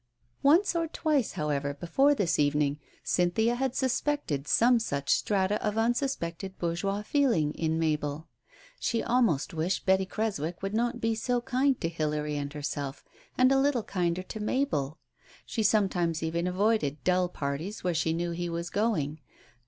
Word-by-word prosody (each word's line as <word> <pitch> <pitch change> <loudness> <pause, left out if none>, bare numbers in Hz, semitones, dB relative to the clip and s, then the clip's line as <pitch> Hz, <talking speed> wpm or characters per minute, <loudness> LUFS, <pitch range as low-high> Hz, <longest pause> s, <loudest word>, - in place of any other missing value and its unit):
Once 340 +7 +4
or 335 -1 +1
twice, 305 -6 0
however, 145 -2 -2
before 270 - +3
this 175 - 0
evening, 145 0 +2 0.2
Cynthia 180 +7 +2
had 260 +1 -1
suspected 260 - -1
some 240 +1 +4
such 140 -10 -2
strata 200 0 +1
of 210 0 -1
unsuspected 225 -6 -1
bourgeois 195 +4 -2
feeling 210 - +2
in 160 -1 -1
Mabel. 155 -1 -1 0.5
She 230 - 0
almost 230 - +1
wished 165 +4 -1
Betty 190 0 +3
Creswick 190 -6 -3
would 195 +1 -2
not 240 +2 0
be 225 0 +1
so 245 +2 0
kind 255 +2 +1
to 165 - +1
Hilary 150 -2 -2
and 145 -1 -3
herself, 145 -1 -4 0.3
and 255 +1 +5
a 270 - +4
little: 270 -4 +2
kinder 180 -2 -1
to 215 - -7
Mabel. 210 - -1 0.5
She 225 - -2
sometimes 180 -7 +1
even 170 +2 -1
avoided 180 -6 +1
dulll 180 -1 +2
parties 150 +9 -4
where 180 -1 +1
she 160 0 +1
knew 170 +1 -1
he 175 +1 -3
was 170 +1 -4
going. 175 -9 0
185 Hz, 155 wpm, -29 LUFS, 155-235 Hz, 0.5 s, and